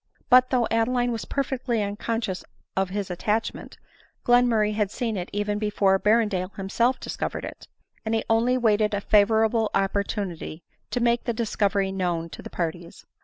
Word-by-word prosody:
But 255 0 +7
though 245 -3 +2
Adeline 245 +2 +1
was 225 -2 -4
perfectly 255 -5 -1
unconscious 205 -1 -3 0.3
of 190 -1 0
his 195 -1 -3
attachment, 210 +5 -2 0.5
Glenmurray 240 -3 +4
had 210 -2 0
seen 225 +1 -3
it 180 -2 -4
even 205 0 -1
before 200 -2 +2
Ber 215 +3 +4
rendale 185 -2 -3
himself 230 +6 0
discovered - - -4
it; - - -10 0.4
and 220 0 -1
he 225 - 0
only 235 +3 +3
waited 215 -3 +2
a 200 - -2
favorable 220 +2 +3
opportunity 195 -4 -2 0.3
to 245 - -2
make 235 0 +2
the 240 - 0
discovery 205 -4 0
known 175 -3 -2
to - - -8
the - - -9
parties. 170 0 -5
210 Hz, 160 wpm, -25 LUFS, 195-230 Hz, 0.5 s, But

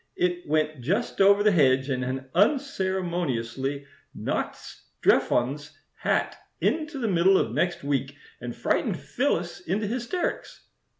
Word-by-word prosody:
It 175 0 -1
went 155 -2 0
just 195 - -1
over 200 +1 +6
the 210 - +5
hedge, 130 -6 +3
and 130 -1 -1
had 130 +1 -4
unceremoniously 175 - 0 0.3
knocked - - -2
Strephon's 145 +5 -1 0.2
hat - - -1 0.2
into 310 -2 -1
the 240 -4 -1
middle 190 0 +4
of - - 0
next 175 -4 -1
week 140 0 -1 0.2
and 120 -1 -6
frightened - - 0
Phyllis - - -1
into 200 +5 -2
hysterics. 240 - -3
170 Hz, 125 wpm, -26 LUFS, 135-200 Hz, 0.3 s, over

